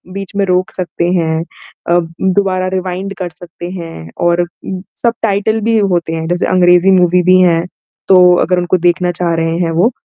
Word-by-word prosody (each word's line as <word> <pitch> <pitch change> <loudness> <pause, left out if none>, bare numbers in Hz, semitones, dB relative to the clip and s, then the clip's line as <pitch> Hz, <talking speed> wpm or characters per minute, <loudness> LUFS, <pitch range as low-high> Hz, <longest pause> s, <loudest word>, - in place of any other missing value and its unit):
बीच 195 +1 -6
में 200 - +2
रोक 185 0 0
सकते 175 -2 -3
हैं। 160 -1 0 0.5
अ, 175 - +4 0.4
दोबारा 185 -2 0
रिवाइंड 185 +1 -4
कर 180 -2 -3
सकते 175 0 -9
हैं 125 - -9 0.2
और 175 0 +2
उम, 180 +2 -7 0.2
सबटाइटल 220 -2 0
भी 225 -1 +3 0.2
होते 170 -2 -2
हैं। 160 0 -4
जैसे 175 0 0
अंग्रेज़ी 180 0 +4
मूवी 180 0 +3
भी 185 - +6
हैं, 170 -2 +2 0.4
तो 180 -2 +6
अगर 180 0 +1
उनको 175 +1 +1
देखना 175 +1 0
चाह 170 -1 +1
रहे 165 0 -1
हैं 165 - 0
वो, 225 +7 +4
180 Hz, 180 wpm, -14 LUFS, 170-185 Hz, 0.5 s, भी